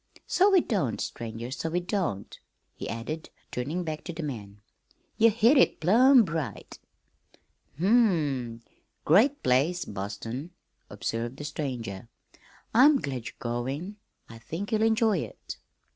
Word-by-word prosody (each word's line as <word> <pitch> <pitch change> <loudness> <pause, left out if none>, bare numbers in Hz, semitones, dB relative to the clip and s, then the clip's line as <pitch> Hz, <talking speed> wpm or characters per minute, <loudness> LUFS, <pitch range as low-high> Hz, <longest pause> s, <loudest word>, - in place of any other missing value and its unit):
"So 385 +3 +4
we 380 -3 +5
don't, 180 - -1
stranger, 115 +1 -5
so 160 +4 -3
we 175 +2 0
don't," 175 - -3 0.3
he - - -7
added, 150 +8 -5 0.2
turning 150 +9 -3
back 155 -2 -5
to 175 - -5
the 165 0 -5
man. 105 -8 -6 0.6
"Ye 230 0 +6
hit 235 +6 +4
it - - +3
plumb 235 - +6
right." 150 - -5 1.0
"Hm 170 - -1 0.2
m! 130 - -2 0.4
great 230 - +4
place, 140 +8 +2
Boston," 105 - -5 0.4
observed 115 +3 -4
the 145 - -7
stranger. 120 -8 -5 0.6
"I'm 275 +6 +7
glad 130 - -4
you're - - -9
going. 135 - -4 0.3
I 115 0 -12
think 175 - -6
you'll 220 -1 +1
enjoy 220 -3 +3
it." - - -7
155 Hz, 135 wpm, -27 LUFS, -, 1.0 s, I'm